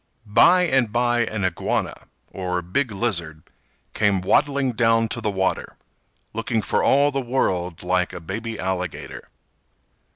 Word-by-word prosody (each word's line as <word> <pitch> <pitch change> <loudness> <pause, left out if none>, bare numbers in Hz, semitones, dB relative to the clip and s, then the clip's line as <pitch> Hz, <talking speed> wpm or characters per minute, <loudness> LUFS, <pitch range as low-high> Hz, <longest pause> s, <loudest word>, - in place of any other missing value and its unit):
By 145 - +5
and 130 -9 +2
by 120 0 +1
an 105 -3 -2
Iguana, 95 - -1 0.4
or 90 -2 -3
big 115 +8 -1
lizard, 85 -8 -2 0.5
came 100 -3 +1
waddling 135 +7 +2
down 115 0 +2
to 120 - -4
the 110 - 0
water, 95 -2 -2 0.6
looking 115 0 -1
for - - 0
all 140 +1 +4
the 135 -1 -1
world 90 -10 -1
like 90 0 0
a - - -7
baby 110 +6 -5
alligator. 90 -2 -4
110 Hz, 135 wpm, -22 LUFS, 95-120 Hz, 0.6 s, By